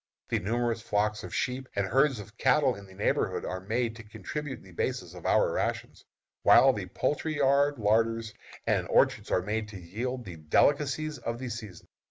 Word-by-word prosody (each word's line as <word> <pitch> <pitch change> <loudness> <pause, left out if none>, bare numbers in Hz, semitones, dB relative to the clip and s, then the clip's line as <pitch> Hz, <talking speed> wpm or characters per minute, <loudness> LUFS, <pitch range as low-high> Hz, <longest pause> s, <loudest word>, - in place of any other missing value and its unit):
The - - +1
numerous 115 +2 -1
flocks 105 0 0
of 90 - -7
sheep 130 +1 -2
and 100 - +1
herds 135 +4 +2
of 105 +2 -10
cattle 130 0 +4
in 100 -3 -11
the 95 - -15
neighborhood 100 - 0
are 95 - -3
made 115 +4 -1
to 115 - -10
contribute 115 +6 -6
the 95 - -15
basis 85 - -3
of - - -6
our - - +3
rations, - - -3 0.4
while 135 0 +7
the 100 -5 -5
poultry 150 - -1
yards, 140 +1 +3
larders, 115 +1 +1 0.3
and - - +1
orchards - - +2
are 90 - +1
made 105 +2 -2
to 105 -3 -9
yield 120 +8 -4
the 90 -4 -8
delicacies 145 - +1
of 115 0 -3
the 130 0 -5
season. 110 -6 -8
115 Hz, 185 wpm, -29 LUFS, 105-130 Hz, 0.4 s, while